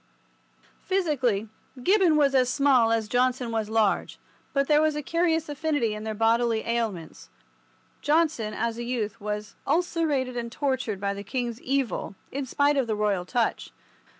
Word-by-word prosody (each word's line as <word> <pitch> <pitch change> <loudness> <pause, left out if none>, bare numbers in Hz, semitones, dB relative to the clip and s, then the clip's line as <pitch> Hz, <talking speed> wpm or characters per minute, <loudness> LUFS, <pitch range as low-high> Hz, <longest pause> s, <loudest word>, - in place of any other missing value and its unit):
Physically, 270 - 0 0.4
Gibbon 375 -3 +4
was 285 -2 +3
as 255 -2 +3
small 260 -4 +4
as 225 -1 +1
Johnson 250 +1 +1
was 220 -2 -2
large, 220 -2 +1 0.3
but 275 -1 +1
there 300 0 +4
was 310 -1 +2
a 300 - -3
curious 330 0 +1
affinity 290 -6 -1
in 210 0 -6
their 220 -1 -3
bodily 225 +1 +2
ailments. 220 -9 -3 0.7
Johnson, 295 -9 +1
as 230 0 -2
a - - -3
youth, 230 -3 -3
was 210 0 -4
ulcerated 300 -5 0
and 235 -1 -4
tortured 260 -7 -2
by 200 0 -1
the 200 0 -7
king's 240 +2 -3
evil, 265 -6 -1 0.2
in 275 0 -4
spite 285 +3 +2
of 265 -3 +1
the 220 - 0
Royal 205 -4 0
touch. 235 +3 -1
245 Hz, 155 wpm, -26 LUFS, 220-290 Hz, 0.7 s, Gibbon